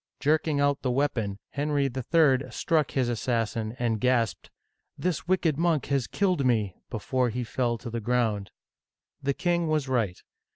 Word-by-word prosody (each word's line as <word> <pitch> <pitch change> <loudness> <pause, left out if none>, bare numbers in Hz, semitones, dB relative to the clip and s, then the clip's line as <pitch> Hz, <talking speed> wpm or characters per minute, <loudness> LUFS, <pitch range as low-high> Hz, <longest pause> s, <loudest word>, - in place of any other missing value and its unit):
Jerking 150 0 +2
out 145 0 +2
the 130 - -1
weapon, 120 -7 0
Henry 145 0 0
III. 135 +1 +2
struck 155 -4 +1
his 130 -3 0
assassin, 115 -2 -1
and 115 -3 0
gasped, 115 -6 +1 0.5
This 180 -1 -2
wicked 170 -5 +1
monk 165 -4 +2
has 135 -4 +1
killed 185 -7 +1
me! 110 -7 +1
'* - - -58
before 125 +3 0
he 125 +2 -3
fell 120 0 -1
to 120 +2 -7
the 115 0 -3
ground. 110 -4 0 0.7
The 140 0 0
king 175 -1 +1
was 155 -3 0
right. 115 -8 0
130 Hz, 160 wpm, -27 LUFS, 115-150 Hz, 0.7 s, Jerking